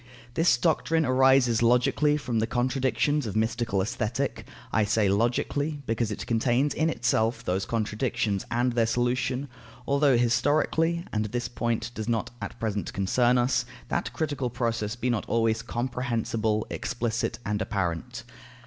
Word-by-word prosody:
This 165 +6 +3
doctrine 165 -1 +1
arises 130 -2 +4
logically 125 +5 +3
from 125 -6 -2
the 110 - 0
contradictions 130 +3 0
of 105 - -5
mystical 110 -3 0
Aesthetic; 120 +6 -2 0.3
I 110 - +3
say, 105 0 +2
logically, 140 +8 0
because 115 -1 -1
it 105 - -5
contains 120 +5 +1
in 160 +1 +1
itself 115 -6 0
those 95 +1 -1
contradictions 110 -2 -1
and 120 +1 +1
their 115 -1 +2
solution; 125 +3 0 0.4
although 140 -2 +3
historically 150 +8 +1
(and 110 0 0
this 120 +3 -3
point 115 -1 -2
does 110 -1 -4
not 115 -2 -1
at - - -6
present 105 -3 -2
concern 120 +6 +2
us) 125 +1 +2 0.3
that 130 - -1
critical 140 0 -2
process 115 -2 -2
be 120 +1 -1
not 115 - -2
always 115 -1 +1
comprehensible, 115 -3 -1
explicit, 120 -3 -2
and 105 +1 -1
apparent. 100 +3 -3
120 Hz, 140 wpm, -27 LUFS, 110-130 Hz, 0.4 s, arises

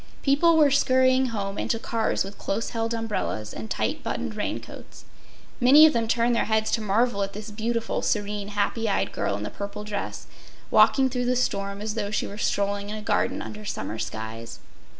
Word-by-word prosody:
People 320 +4 +4
were 295 -3 +5
scurrying 260 -1 +4
home 200 -4 -3
and - - -3
to 230 - +2
cars 225 0 0
with 195 +1 -10
close 220 +4 -2
held 225 0 -2
umbrellas 215 - -3
and 220 - -7
tight - - -1
buttoned - - -3
raincoats. - - -6 0.5
Many 280 +5 +8
of 310 - +5
them 230 -1 0
turned 235 +1 +2
their - - +1
heads 220 0 +1
to 225 - +1
marvel 215 +1 +1
at 195 0 -2
this 210 +1 -7
beautiful, 230 +2 -2
serene, 205 -1 -1
happy 210 +2 -1
eyed 195 - 0
girl 100 - -1
in 105 - -5
the - - -5
purple 200 +1 -6
dress 210 -1 -5 0.5
walking 270 -1 +5
through 250 -1 -2
the 250 +1 +2
storm 200 -5 -1
as 215 0 -3
though 210 -2 -2
she 215 - -1
were 205 - -8
strolling 200 0 -1
in 210 - -4
a 215 - -6
garden - - 0
under 215 0 -8
summer 110 - -4
skies. 110 +1 -6
215 Hz, 195 wpm, -25 LUFS, 200-240 Hz, 0.5 s, Many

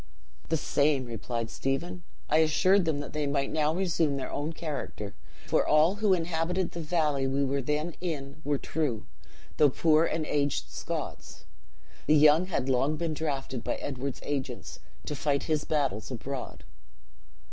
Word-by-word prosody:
"The 160 - +2
same," 145 -3 +2
replied 115 0 -4
Stephen; 165 +7 -2 0.3
"I 155 - +3
assured 180 +5 +4
them 150 -3 0
that 145 - -8
they 150 -1 -1
might 140 -1 0
now 155 -1 +2
resume 165 -5 +1
their 130 - -4
own 145 +3 -2
character; 150 -10 -5 0.3
for - - +3
all 155 +6 +4
who 210 -1 +2
inhabited 170 +1 0
the 170 - -6
valley 150 -4 +1
we 140 +1 +1
were 140 +1 0
then 150 +5 -1
in 150 -4 -4
were 145 0 +1
true, 135 -7 -2 0.5
though 150 - +6
poor 155 +3 +4
and 160 -1 -1
aged 140 - 0
Scots. 65 - -5 0.6
The 155 - +6
young 155 +4 +6
had 140 -8 -1
long 135 +4 +2
been 165 -1 -1
drafted 135 -5 -3
by - - -1
Edward's 135 -1 -4
agents, 140 -2 -4 0.3
to 150 - -3
fight 140 -1 0
his 155 -2 0
battles 140 -9 0
abroad. 130 +1 -6
150 Hz, 160 wpm, -29 LUFS, 135-160 Hz, 0.6 s, though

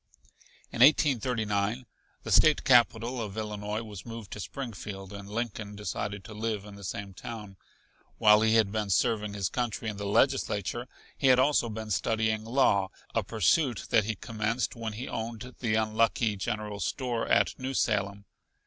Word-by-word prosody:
In - - -6
1839 120 -5 +3 0.4
the - - -5
State 155 -1 +5
Capitol 120 -1 +3
of 105 -1 -6
Illinois 105 0 -3
was 105 -4 -9
moved 115 -3 -8
to - - -6
Springfield 100 -5 -6
and 100 0 -8
Lincoln 110 -2 -4
decided 100 0 -4
to 110 - -10
live 105 -1 -3
in 105 - -10
the 100 0 -11
same 100 +1 -5
town. 105 0 -8 0.6
While 105 -1 +6
he 110 0 +3
had 110 -3 +3
been 105 -1 -2
serving 105 +2 +1
his 100 -3 0
country 120 -1 -2
in 105 - -6
the 100 0 -4
Legislature 105 +3 +1 0.3
he 135 - +1
had 130 -1 +7
also 130 -2 +3
been 110 0 -6
studying 110 +1 0
law 110 -6 +3 0.2
a 115 - +2
pursuit 115 - +1
that 105 - +4
he 110 0 -2
commenced 115 +5 -2
when 115 -2 -4
he 120 +5 -6
owned 115 +2 -5
the 110 -3 0
unlucky 110 0 +1
general 105 +1 -3
grocery 85 - 0
store 125 -4 -2
at - - +2
New 130 +1 -3
Salem. 100 -3 0
110 Hz, 165 wpm, -29 LUFS, 105-115 Hz, 0.6 s, had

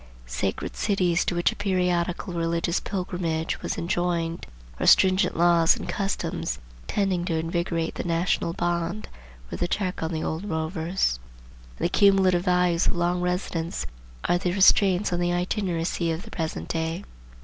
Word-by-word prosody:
Sacred 60 +1 -3
cities, 180 -4 +1
to 175 - -1
which 175 - +2
a - - -8
periodical 180 -2 0
religious 170 +1 0
pilgrimage 180 -4 -3
was - - -3
enjoined, 170 -1 -1 0.3
or - - 0
stringent 185 -1 +5
laws 170 -1 +5
and - - -7
customs, 195 -1 -2 0.3
tending 190 -4 0
to 170 -2 -1
invigorate 165 0 -1
the - - -4
national 170 0 0
bond, 175 +3 -2 0.4
were - - -4
the 175 - 0
check 185 0 -2
on 160 +1 -2
the 160 -1 -2
old 160 +4 -3
rovers; 160 - -1 0.6
and - - -2
the - - +2
cumulative 190 -2 +4
values 180 -2 +2
of - - +1
long 175 +1 0
residence 180 -2 -2 0.4
are 175 - +2
the 180 -1 -1
restraints 195 -1 +4
on 175 - 0
the 175 0 +1
itineracy 175 -2 -1
of 165 +3 -4
the 220 - -12
present 160 -2 -4
day. 165 +3 -2
175 Hz, 155 wpm, -25 LUFS, 165-185 Hz, 0.6 s, stringent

